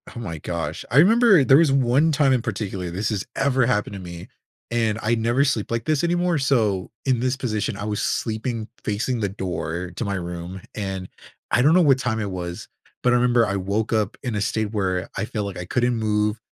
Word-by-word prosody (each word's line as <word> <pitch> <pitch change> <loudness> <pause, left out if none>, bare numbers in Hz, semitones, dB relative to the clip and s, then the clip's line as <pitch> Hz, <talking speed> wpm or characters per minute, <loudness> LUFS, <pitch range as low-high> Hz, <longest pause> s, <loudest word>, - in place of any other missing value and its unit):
Oh - - -6
my 85 -9 -5
gosh, 80 -1 -4
I 120 - +1
remember 205 - +6
there 135 +1 +6
was 160 -3 +4
one 135 +4 +3
time 140 -2 +3
in 125 - +1
particular 100 -5 -4
this 95 +6 -2
has 105 -4 -2
ever 135 -2 +2
happened 105 -4 0
to 100 - -6
me, 85 -1 -9 0.4
and 115 -2 +1
I 110 +2 +1
never 120 +4 +2
sleep 115 -7 -1
like 115 -1 -2
this 155 -1 +1
anymore, 175 -1 +1
so 110 -9 +1 0.2
in 130 -3 +2
this 130 +2 0
position, 110 -5 -2
I 100 - -5
was 105 -1 -2
sleeping 110 0 -2 0.2
facing 115 +4 -1
the 100 -3 -1
door 90 -2 -4
to 115 - -3
my 100 - -2
room, 90 +1 -5 0.2
and 95 -3 -4 0.4
I 120 - +4
don't 150 +5 +5
know 180 - +6
what 135 -4 +4
time 110 -3 -1
it 100 -3 -3
was, 90 -1 -6 0.4
but 125 - +4
I - - +4
remember 120 -1 +3
I 100 -1 -1
woke 100 +4 -1
up 105 -3 0
in 125 - -2
a 105 - -1
state 110 -1 -1
where 95 -4 -1
I 100 - -1
felt 110 -3 -3
like 100 -2 -6
I 90 - -5
couldn't 120 +5 +1
move. 105 0 0
110 Hz, 220 wpm, -23 LUFS, 100-125 Hz, 0.4 s, remember